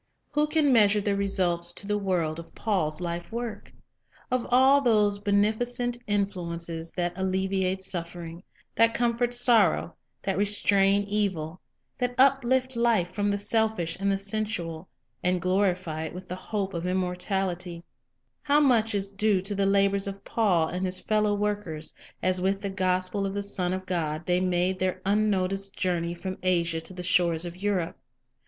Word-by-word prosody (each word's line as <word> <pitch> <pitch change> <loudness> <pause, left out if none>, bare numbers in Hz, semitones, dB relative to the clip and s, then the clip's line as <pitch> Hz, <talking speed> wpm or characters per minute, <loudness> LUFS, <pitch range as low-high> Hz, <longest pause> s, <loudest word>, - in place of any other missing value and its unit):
"" - - -47
Who 295 +1 +2
can 300 -3 +3
measure 210 -2 +5
the 200 0 0
results 180 -4 0
to 200 - -4
the 210 0 0
world 170 -5 -1
of 165 - -12
Paul's 180 -8 -1
life 170 +1 -4
work? 235 -1 -5 0.6
Of 255 -1 0
all 265 +3 +5
those 210 -5 +3
beneficent 220 +4 +1
influences 170 -5 -2
that 175 -1 -2
alle 190 0 -2
viate 190 0 0
suffering, 170 -2 -5 0.3
that 230 0 +3
comfort 240 0 +1
sorrow, 235 -9 +3 0.3
that 195 0 -1
restrain 200 -1 +3
evil, 190 -5 -2 0.4
that 245 -1 -1
uplift 260 -1 +3
life 225 -7 +1
from 205 +1 0
the 200 - +1
selfish 215 -5 0
and 200 0 +1
the 195 - +1
sensual, 195 -5 -3 0.3
and 180 0 +1
glorify 180 -3 0
it 160 - -7
with 185 0 -8
the 180 - -4
hope 195 +1 -3
of 170 +1 -3
immortality, 180 -1 -2 0.6
how 290 0 +3
much 230 -7 +3
is 195 0 -2
due 200 0 +2
to 195 +2 -2
the 195 0 +1
labors 200 0 +3
of 195 0 -6
Paul 185 -8 +2
and 180 +1 -3
his 185 0 +1
fellow 210 -1 +1
workers, 205 -7 -3 0.3
as 185 0 +2
with 195 +1 0
the 200 -1 -3
gospel 185 +1 0
of 195 - -5
the 200 - -2
Son 185 -3 -1
of 185 0 -3
God 165 -3 -2
they 180 0 +1
made 185 0 0
their 185 0 -1
unnoticed 195 -1 0
journey 175 -2 -1
from 185 +2 -6
Asia 170 -3 +1
to 185 - -6
the 180 - -6
shores 175 -2 +2
of 175 +2 -8
Europe? 190 -4 -1
195 Hz, 165 wpm, -27 LUFS, 180-210 Hz, 0.6 s, measure